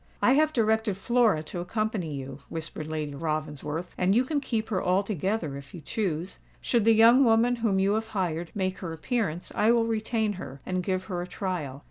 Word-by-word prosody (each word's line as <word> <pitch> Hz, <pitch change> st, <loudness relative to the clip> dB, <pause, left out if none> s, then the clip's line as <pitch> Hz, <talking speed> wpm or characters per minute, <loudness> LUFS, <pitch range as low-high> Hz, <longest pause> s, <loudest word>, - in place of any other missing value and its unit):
"I -, -, +4 dB
have 310 Hz, +2 st, +4 dB
directed 220 Hz, -5 st, +1 dB
Flora 225 Hz, -6 st, +2 dB
to 175 Hz, -, -6 dB
accompany 195 Hz, -4 st, -2 dB
you," 135 Hz, 0 st, -7 dB
whispered 160 Hz, -1 st, -5 dB
Lady 155 Hz, -2 st, -3 dB
Ravensworth; 155 Hz, +2 st, -3 dB
"and 185 Hz, +2 st, +3 dB
you 250 Hz, +2 st, +4 dB
can 290 Hz, +1 st, -1 dB
keep 225 Hz, -5 st, -2 dB
her 195 Hz, -4 st, 0 dB
altogether, 190 Hz, -3 st, 0 dB
if 140 Hz, +2 st, -11 dB
you 170 Hz, -, -8 dB
choose. 180 Hz, 0 st, -3 dB, 0.2 s
Should 235 Hz, -4 st, +1 dB
the 225 Hz, -, +6 dB
young 235 Hz, +4 st, +7 dB
woman 235 Hz, +1 st, +4 dB
whom 225 Hz, -4 st, +1 dB
you 195 Hz, +1 st, +3 dB
have 220 Hz, +1 st, -1 dB
hired, 175 Hz, -6 st, -2 dB
make 185 Hz, -2 st, -1 dB
her 170 Hz, -3 st, -5 dB
appearance, 175 Hz, -, -2 dB
I 210 Hz, +2 st, +3 dB
will 235 Hz, -1 st, +3 dB
retain 220 Hz, -1 st, 0 dB
her, 135 Hz, 0 st, -8 dB
and 185 Hz, 0 st, -1 dB
give 185 Hz, 0 st, -1 dB
her 185 Hz, -3 st, -4 dB
a 175 Hz, -, -5 dB
trial. 175 Hz, -10 st, -4 dB
190 Hz, 195 wpm, -27 LUFS, 160-225 Hz, 0.2 s, young